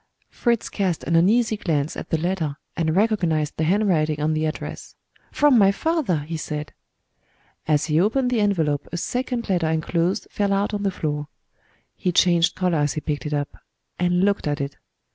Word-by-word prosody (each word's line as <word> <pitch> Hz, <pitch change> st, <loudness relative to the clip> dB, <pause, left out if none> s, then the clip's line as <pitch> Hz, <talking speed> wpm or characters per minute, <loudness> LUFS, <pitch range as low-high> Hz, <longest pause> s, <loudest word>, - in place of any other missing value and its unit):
Fritz 235 Hz, -3 st, 0 dB
cast 185 Hz, -5 st, -1 dB
an 165 Hz, -, 0 dB
uneasy 215 Hz, +6 st, +3 dB
glance 155 Hz, -7 st, -1 dB
at -, -, -7 dB
the 160 Hz, -, +1 dB
letter, 160 Hz, -3 st, -2 dB, 0.2 s
and 160 Hz, -1 st, 0 dB
recognized 175 Hz, -8 st, +1 dB
the 160 Hz, -, +1 dB
handwriting 165 Hz, -5 st, +2 dB
on 155 Hz, +1 st, +1 dB
the 155 Hz, 0 st, 0 dB
address. 155 Hz, -, -5 dB, 0.4 s
"From 290 Hz, -5 st, +4 dB
my 195 Hz, -1 st, +6 dB
father!" 275 Hz, -, 0 dB
he 160 Hz, +3 st, -5 dB
said. 150 Hz, -1 st, -5 dB, 0.9 s
As 150 Hz, -2 st, +2 dB
he 155 Hz, 0 st, +2 dB
opened 250 Hz, +6 st, +1 dB
the 240 Hz, -, +1 dB
envelope 160 Hz, -8 st, +1 dB
a 175 Hz, -, -3 dB
second 245 Hz, +5 st, -2 dB
letter 175 Hz, -5 st, +1 dB
enclosed 170 Hz, +5 st, 0 dB
fell 200 Hz, -1 st, 0 dB
out 200 Hz, +2 st, 0 dB
on 205 Hz, -, -2 dB
the 200 Hz, -, +1 dB
floor. 150 Hz, -5 st, -3 dB, 0.7 s
He 180 Hz, -, -1 dB
changed 175 Hz, -1 st, +3 dB
color 180 Hz, -4 st, +1 dB
as 145 Hz, -1 st, +1 dB
he 155 Hz, -, -4 dB
picked 145 Hz, -3 st, -3 dB
it 150 Hz, -, -3 dB
up, 145 Hz, 0 st, -3 dB, 0.4 s
and 180 Hz, +1 st, +2 dB
looked 200 Hz, -5 st, +1 dB
at 145 Hz, 0 st, -1 dB
it. 140 Hz, 0 st, -4 dB
170 Hz, 180 wpm, -23 LUFS, 155-200 Hz, 0.9 s, my